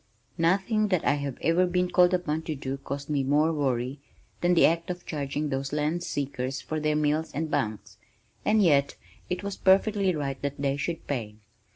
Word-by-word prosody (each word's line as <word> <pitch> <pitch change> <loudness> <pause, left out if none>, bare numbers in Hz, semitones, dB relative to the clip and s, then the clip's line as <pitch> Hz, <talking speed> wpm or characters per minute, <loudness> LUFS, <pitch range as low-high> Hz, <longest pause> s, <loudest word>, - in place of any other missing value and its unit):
Nothing 195 +6 +2
that 185 -5 0
I - - +4
have 140 -3 -3
ever 175 +3 +3
been 180 0 0
called 180 -1 +5
upon 160 -3 -1
to 155 - -1
do 135 0 -4
caused 140 +1 -6
me 145 -2 0
more 150 +4 +2
worry 130 -2 -1 0.4
than 175 0 +3
the - - +6
act 165 +1 +1
of 175 -1 -5
charging 145 0 -3
those 135 0 -2
land 150 +3 0
seekers 135 -4 -3
for 155 - -4
their 150 0 +1
meals 150 +1 0
and 155 +1 -3
bunks, 110 -1 -2 0.5
and 215 -1 +3
yet 140 -5 +3 0.3
it 180 +2 -3
was 200 -1 -4
perfectly 195 -1 +3
right 140 -3 -3
that 140 0 -3
they 140 -1 0
should 155 +4 -4
pay. 115 -7 -3
150 Hz, 190 wpm, -27 LUFS, 140-175 Hz, 0.5 s, the